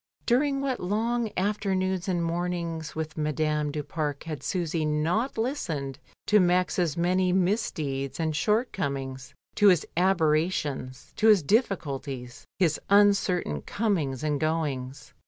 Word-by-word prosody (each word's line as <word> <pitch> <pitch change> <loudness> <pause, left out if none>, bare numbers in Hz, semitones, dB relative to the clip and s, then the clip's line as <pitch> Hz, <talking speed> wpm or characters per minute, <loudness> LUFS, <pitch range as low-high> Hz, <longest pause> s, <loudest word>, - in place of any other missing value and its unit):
During 275 +3 +2
what 270 -2 -1
long 225 +5 0
afternoons 190 -2 0
and 175 -2 0
mornings 170 -2 -3
with 155 0 -4
Madame 150 0 0
du 150 0 -3
Pare 150 -1 -3
had 155 -3 -5
Susy 170 -3 -1
not 160 - 0
listened 160 - -2 0.3
to 210 - +5
Max's 180 -3 +2
many 180 +2 +2
misdeeds 160 - -1
and 160 -2 0
shortcomings, 140 - -1 0.2
to 205 - +4
his 180 -5 +5
aberrations, 155 -6 0
to 220 - +3
his 210 -6 +6
difficulties, 140 - -1
his 170 -5 +2
uncertain 200 - +3
comings 160 - -1
and 150 -2 0
goings. 145 -4 -2
170 Hz, 120 wpm, -27 LUFS, 150-195 Hz, 0.3 s, his